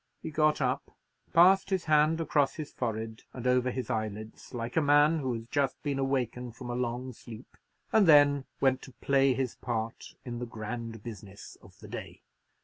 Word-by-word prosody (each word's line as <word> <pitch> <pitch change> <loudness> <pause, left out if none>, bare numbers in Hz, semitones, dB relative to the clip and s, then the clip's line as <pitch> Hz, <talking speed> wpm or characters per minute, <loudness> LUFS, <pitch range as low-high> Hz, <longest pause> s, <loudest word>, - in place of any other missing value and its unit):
He - - -5
got 155 0 +2
up, 130 +2 -1 0.4
passed 185 +4 +6
his 190 -3 0
hand 155 +1 +3
across 145 -3 +1
his 155 -3 -6
forehead 110 -2 -4
and 125 -1 -7
over 125 0 +3
his 125 -1 -4
eyelids, 110 -1 -5
like 120 -1 -5
a 160 - +4
man 145 +2 +4
who 130 -3 -2
had 115 0 -7
just 140 -3 0
been 140 -2 -1
awakened 125 -3 -2
from 120 0 -6
a - - -3
long 125 +1 -3
sleep; 115 +1 -12 0.4
and 210 -4 +5
then 145 -3 +6
went 130 -1 +2
to 130 - -12
play 135 0 +2
his 130 -2 -1
part 115 -2 -4
in 120 -1 -5
the 120 - -4
grand 115 0 -6
business 105 -4 -10
of - - -18
the - - -10
day. - - -8
130 Hz, 185 wpm, -29 LUFS, 115-145 Hz, 0.4 s, passed